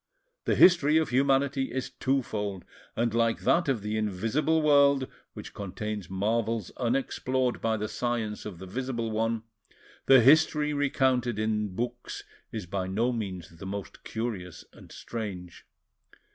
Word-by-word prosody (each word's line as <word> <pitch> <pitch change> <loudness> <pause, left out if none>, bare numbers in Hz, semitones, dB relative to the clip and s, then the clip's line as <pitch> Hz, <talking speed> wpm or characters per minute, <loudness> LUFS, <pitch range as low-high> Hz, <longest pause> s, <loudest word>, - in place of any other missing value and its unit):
The - - +2
history 160 -4 +6
of 160 - +1
humanity 135 +1 +2
is 130 0 -3
twofold, 105 -8 -2 0.3
and 115 -1 0
like 115 -1 +1
that 170 -3 +2
of 120 -7 0
the 105 +1 -2
invisible 115 - 0
world, 140 -2 +5 0.3
which - - -9
contains 105 0 -5
marvels 110 +2 -1
unexplored 130 0 0
by 110 -1 +1
the 105 0 -2
science 110 -1 -2
of 100 -5 -7
the 95 - -9
visible 120 +2 -3
one, 115 +1 -1 0.6
the 135 -2 +8
history 150 +3 +4
recounted 130 -5 +1
in 105 -3 -1
books 120 +2 -4 0.3
is 110 -5 -5
by 95 +1 -3
no 115 +6 0
means 90 -7 -6
the 95 - -7
most 100 0 -6
curious 105 -7 -5
and - - -15
strange. 95 -6 -7
115 Hz, 140 wpm, -28 LUFS, 105-130 Hz, 0.6 s, the